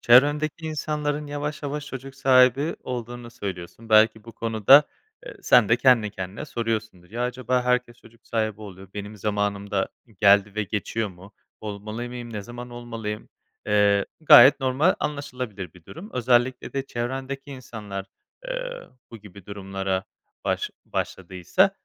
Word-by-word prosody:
Çevrendeki 145 +6 +4
insanların 150 -1 -2
yavaş 145 +1 -4
yavaş 145 +1 -4
çocuk 135 -1 -8
sahibi 130 +2 +4
olduğunu 120 -1 -6
söylüyorsun. 100 0 -7
Belki 110 0 +5
bu 115 - -11
konuda, 115 +5 +6 0.4
eee, - - -8
sende 120 -1 +5
kendi 120 -5 +4
kendine 95 0 -6
soruyorsundur. 110 -6 -4
"Ya 120 +3 -3
acaba 125 0 0
herkes 125 -1 +1
çocuk 115 -1 -20
sahibi 110 -2 -1
oluyor, 95 -2 -10
benim 105 +1 -6
zamanım 100 -1 -2
da 95 -1 0 0.3
geldi 100 0 +5
ve 110 - 0
geçiyor 105 +2 -2
mu? 95 +3 -14 0.3
Olmalı 105 +3 -5
mıyım? 120 -1 -7
Ne 105 -2 -4
zaman 120 +3 -9
olmalıyım?" 115 -3 -6 0.4
Eee, 100 -1 +3
gayet 140 -3 +9
normal 135 +7 +3
anlaşılabilir 125 - -4
bir 90 -2 -17
durum. 185 - -10
Özellikle 125 +1 +1
de 135 0 -3
çevrendeki 135 +3 -4
insanlar, 110 -7 -7 0.4
ııı, - - -6
bu 115 - -8
gibi 100 -2 -14
durumlara 95 -1 -3 0.4
baş - - -1
başladıysa. 95 -1 0
115 Hz, 135 wpm, -25 LUFS, 105-130 Hz, 0.4 s, gayet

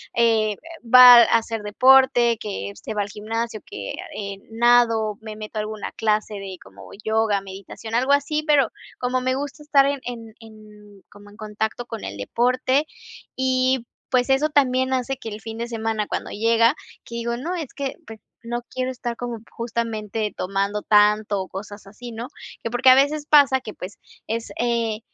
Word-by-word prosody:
eh, 220 -3 +2 0.3
va 250 +1 +10
a 230 - +4
hacer 225 -1 -4
deporte, 245 +1 +4
que 100 - -5
se 100 - -7
va 210 - -1
al 200 - -4
gimnasio, 220 +2 -4
que, 410 - -7 0.2
eh, 200 -1 -5
nado, 230 -2 +3
me 215 -1 -8
meto 215 0 -8
a - - +1
alguna 215 -1 -6
clase 215 -1 -1
de 195 -2 -7
como 95 +1 -14
yoga, 220 -2 +1
meditación, 195 +3 -8
algo 260 +4 +3
así. 300 +2 0
Pero 285 -6 +3 0.3
como 250 0 -1
me 255 0 0
gusta 285 +2 -6
estar 285 -2 +4
en 280 0 -1
en 230 -3 -7
en 210 -2 -16
como 205 0 -16
en 205 - -17
contacto 220 +2 -4
con 225 -2 -7
el 100 +1 -6
deporte, 255 - +1 0.5
y 260 -1 +1 0.2
pues 250 0 +1
eso 270 +3 +3
también 260 -2 +2
hace 260 +1 -1
que 225 - -7
el 210 0 -8
fin 225 0 -7
de 235 +1 -4
semana, 225 -2 -2
cuando - - -4
llega, 230 +4 +3 0.3
que 235 - -10
digo: 235 0 -2
"No, 340 +8 -4
es 315 -7 -6
que, 275 -2 -4
pues, 225 -1 -10 0.2
no 240 +1 -4
quiero 255 0 -3
estar 240 -2 -5
como 240 -2 -5
justamente 225 -2 -3
tomando 195 +2 -1
tanto 210 -1 +3
o 190 - -6
cosas 205 +1 -9
así", 240 +4 -10
¿no? 230 +2 -6 0.4
Que 230 - -2
porque 255 +1 +4
a 255 - +9
veces 290 +2 +2
pasa 285 -3 +5
que, 215 - -8
pues, 185 +3 -9 0.3
es, 230 +1 -4
eh, 230 -2 0
230 Hz, 180 wpm, -22 LUFS, 210-255 Hz, 0.5 s, va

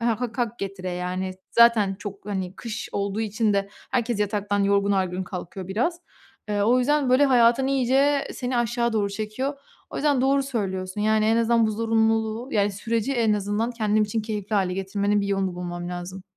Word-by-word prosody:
ha 230 -1 0
hak 240 -1 -2
getire 190 -2 -5
yani, 180 +1 -3 0.2
zaten 230 -4 +5
çok, 205 -1 -8
hani, 190 -3 -3
kış 230 -2 -5
olduğu 200 +1 -2
için 215 0 0
de 200 0 0 0.2
herkes 240 -4 0
yataktan 205 -1 0
yorgun 200 0 +2
argın 185 -1 0
kalkıyor 180 +1 -7
biraz. 250 - -1 0.5
Eee, 205 -1 0
o 240 +4 +4
yüzden, 285 0 +2
böyle, 260 +3 +5
hayatın, 245 0 +4
iyice 275 +2 +2
seni 250 -1 -2
aşağı 235 0 0
doğru 210 -2 +1
çekiyor. 215 +7 -3 0.4
O - - -7
yüzden 285 -3 +2
doğru 275 +1 +3
söylüyorsun, 195 -7 -3
yani 215 0 +3
en 225 +1 +3
azından 230 0 +3
bu - - 0
zorunluluğu 225 +1 0
yani 205 -1 +2
süreci 230 +5 -1
en 230 -3 +2
azından, 210 +3 -1
kendim 215 -3 +1
için 215 +1 -2
keyifli 210 -1 -4
hâle 185 -2 +1
getirmenin 200 +2 0
bir 200 - -2
yolunu 195 -2 -1
bulmam 175 0 -5
lazım. 180 +1 -6
215 Hz, 180 wpm, -24 LUFS, 195-235 Hz, 0.5 s, zaten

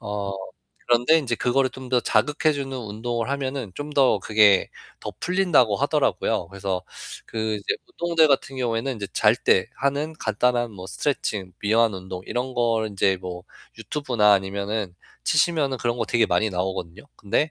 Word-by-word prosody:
어 100 -1 -4 0.5
그런데 120 +6 +4
인제 125 -6 -1
그거를 130 +3 +2
좀 130 0 -10
더 125 - +3
자극해 150 +4 +2
주는 135 -1 -4
운동을 115 +1 -4
하면은 135 -5 -3
좀 145 +1 -6
더 130 -7 +4
그게 105 -1 +4 0.3
더 - - -5
풀린다고 175 - +3
하더라고요. 85 - 0
그래서 95 -1 -3 0.4
그 110 -1 -2
이제 100 - -2 0.3
운동들 165 -2 +4
같은 135 -1 +1
경우에는 120 +1 -1
이제 100 -1 -5
잘 110 +1 +4
때 95 -6 +2
하는 140 +3 -1
간단한 120 +2 +1
뭐 95 -2 -9
스트레칭, 100 -8 -2
이완 110 +1 +3
운동 95 -1 -7
이런 125 +1 -3
거를 115 -2 +1
인제 95 -1 +1
뭐 90 -1 -7 0.3
유튜브나 120 -8 +2
아니면은 100 0 -1 0.3
치시면은 155 -5 +2
그런 120 0 -1
거 115 - -1
되게 115 -1 +2
많이 105 +5 +1
나오거든요. 95 +1 -4
근데 145 +10 0
115 Hz, 350 characters per minute, -24 LUFS, 100-135 Hz, 0.5 s, 그런데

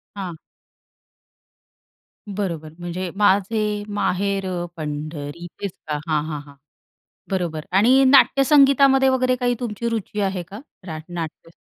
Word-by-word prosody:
हां. 185 -4 -5 1.9
बरोबर. 175 -6 -4
म्हणजे 175 +1 -4
माझे 210 +1 +2
माहेर 200 0 0 0.3
पंढरी 150 +1 -5
तेच 200 - -2 0.2
का? 150 -1 -1
हां, 155 -2 +1
हां, 150 -2 -4
हां, 140 -1 -16 0.8
बरोबर 170 -5 -2
आणि 245 +8 +5
नाट्यसंगीतामध्ये 275 0 +5
वगैरे 255 -1 +2
काही 245 -1 +1
तुमची 235 -1 -3
रुची 220 -2 -3
आहे 190 -2 -1
का? 205 +3 -8 0.3
रा 160 -3 -5
नाट्य, 165 -1 -6
195 Hz, 115 wpm, -22 LUFS, 165-235 Hz, 1.9 s, आणि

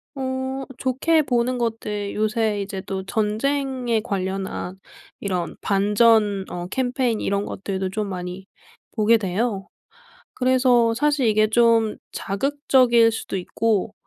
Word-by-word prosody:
어. 260 0 -3 0.2
좋게 285 +6 +2
보는 250 -1 0
것들 215 -3 -3
요새 215 -1 0
이제 195 -1 -5
또 190 0 -5
전쟁에 240 +3 0
관련한 190 -1 -4 0.4
이런 180 -4 -2
반전 205 0 +3
어 175 0 -5
캠페인 250 0 -1
이런 200 +1 -1
것들도 190 -1 -4
좀 210 +2 -3
많이 180 0 -6 0.5
보게 225 +1 +4
돼요. 195 0 -2 0.7
그래서 250 -2 +3
사실 290 -1 +1
이게 215 0 +3
좀 225 -1 +3 0.2
자극적일 245 0 +2
수도 220 - -5
있고 210 +2 -1
220 Hz, 230 characters per minute, -23 LUFS, 200-250 Hz, 0.7 s, 보게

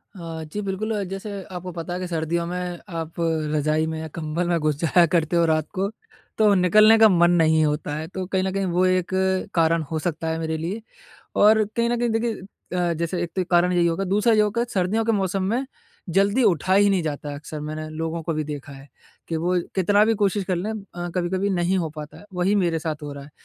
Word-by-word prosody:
अ, 165 -3 -6
जी 160 +7 -5
बिल्कुल 205 +3 -2
जैसे 195 +3 -6 0.2
आपको 180 0 -6
पता 170 0 -5
है, 180 - -3
कि 185 - -4
सर्दियों 170 0 -1
में 180 0 -4 0.2
आप 165 0 -6 0.4
रजाई 155 +1 +1
में 160 0 -4
या 160 - -5
कंबल 165 +2 -2
में 170 - +2
घुस 155 -1 +1
जाया 170 +1 +4
करते 170 0 0
हो 170 0 +4
रात 155 -1 +1
को, 195 0 -1 0.5
तो 215 -2 +5
निकलने 215 +5 +6
का 220 -1 +8
मन 175 -2 +4
नहीं 160 -2 +4
होता 150 0 -2
है, 155 +1 -4
तो 185 +1 -5
कहीं 190 0 -1
न 190 - -1
कहीं 195 0 0
वो 180 0 +2
एक 185 -1 +1 0.5
कारण 165 0 +3
हो 160 - -1
सकता 165 0 -3
है 160 0 -2
मेरे 160 0 -2
लिए। 180 +8 -4 0.6
और 215 +1 +5
कहीं 235 0 +2
न 240 - 0
कहीं 240 0 +1
देखिए 225 0 -1 0.3
अ, 175 -1 +1
जैसे 170 +2 -2
एक 175 - -3
तो 185 - +2
कारण 175 0 +4
यही 175 -1 +3
होगा, 170 +3 0
दूसरा 210 +5 +2
ये 215 - +4
होगा 210 +3 +1
सर्दियों 195 +4 +1
के 225 - +2
मौसम 195 -2 0
में 255 +3 0 0.5
जल्दी 200 +6 +3
उठा 185 -2 +2
ही 205 +1 +5
नहीं 190 -3 +1
जाता 150 -1 -4
है 145 - -5
अक्सर 150 +1 -7
मैंने 155 +1 -5
लोगों 165 +1 -3
को 165 - -2
भी 155 0 -2
देखा 145 -2 -7
है, 135 +1 -13 0.4
कि 165 - -1
वो 175 +3 0 0.2
कितना 205 +3 +4
भी 225 +1 +2
कोशिश 200 0 +1
कर 185 -1 -1
लें 190 +5 -3
अ, 190 -5 -6
कभी-कभी 185 +3 0
नहीं 180 0 +1
हो 165 -3 -1
पाता 150 0 -8
है, - - -14
वही 180 +3 +1
मेरे 175 -5 +1
साथ 155 -2 -4
हो 145 -1 -5
रहा 140 0 -9
है। 145 - -15
175 Hz, 235 wpm, -23 LUFS, 160-195 Hz, 0.6 s, का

